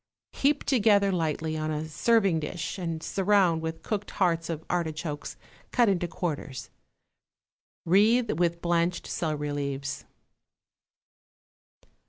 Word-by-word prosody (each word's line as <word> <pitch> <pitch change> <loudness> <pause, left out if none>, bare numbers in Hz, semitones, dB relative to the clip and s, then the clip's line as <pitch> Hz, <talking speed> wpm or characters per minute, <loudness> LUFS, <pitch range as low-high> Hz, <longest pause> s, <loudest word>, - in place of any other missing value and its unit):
Heap 285 +1 +1
together 205 -6 +3
lightly 160 -2 -1
on 155 0 -2
a 155 0 -2
serving 195 +1 +2
dish 160 +4 -4
and 165 -3 -3
surround 190 -4 +2
with 160 0 -5
cooked 205 -2 -3
hearts 170 -4 +1
of 160 -1 -4
artichokes 160 -3 -3 0.3
cut 240 -4 +4
into 175 -3 +1
quarters; 150 -6 -4 1.1
wreathe 215 +6 +4
with 170 -1 0
blanched 170 0 +1
celery 150 -3 -2
leaves. 140 0 -3
170 Hz, 110 wpm, -27 LUFS, 155-195 Hz, 1.1 s, cut